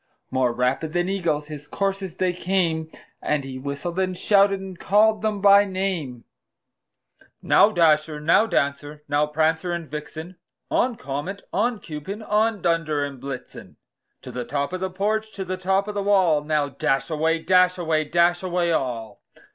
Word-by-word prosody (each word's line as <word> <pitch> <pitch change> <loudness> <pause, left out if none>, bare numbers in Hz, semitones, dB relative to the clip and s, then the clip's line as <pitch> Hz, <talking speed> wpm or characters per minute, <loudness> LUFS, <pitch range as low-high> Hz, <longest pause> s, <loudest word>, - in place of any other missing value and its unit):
More 130 -2 +2
rapid 125 +6 -1
than 175 +1 0
eagles 165 -6 -1
his 150 -1 -9
coursers 195 -1 -3
they 185 -1 0
came, 170 -3 -1 0.3
And 150 -2 0
he 130 -1 -7
whistled, 140 +6 -4
and 185 -1 -1
shouted, 195 0 +3
and 190 -2 -9
called 215 +2 +3
them 215 -2 -1
by 200 0 +7
name; 185 -11 -3 1.2
"Now, 205 - +5
Dasher! 155 -4 +2
now, 165 +9 +3
Dancer! 145 -3 -2
now, 145 +1 +1
Prancer 160 +3 0
and 170 -2 -4
Vixen! 155 +4 -8 0.3
On! 245 -1 +1
Comet, 150 +6 -5
on! 225 +3 0
Cupid, 170 +8 -7
on! 215 -1 +1
Dunder 165 -3 +1
and 140 -3 -9
Blitzen 135 -1 -8 0.5
To 125 - -8
the 125 0 -4
top 140 +6 -3
of 185 - -3
the 190 0 -2
porch, 215 +3 -1
to 190 - -5
the 185 0 -3
top 190 +2 0
of 210 - -4
the 205 - -2
wall! 185 -7 +3
Now, 150 -1 0
dash 135 0 -1
away, 160 +1 +1
dash 180 +2 +3
away, 160 -3 0
dash 175 +3 +2
away 175 -2 0
all!" 120 -7 -3
170 Hz, 165 wpm, -23 LUFS, 150-195 Hz, 1.2 s, by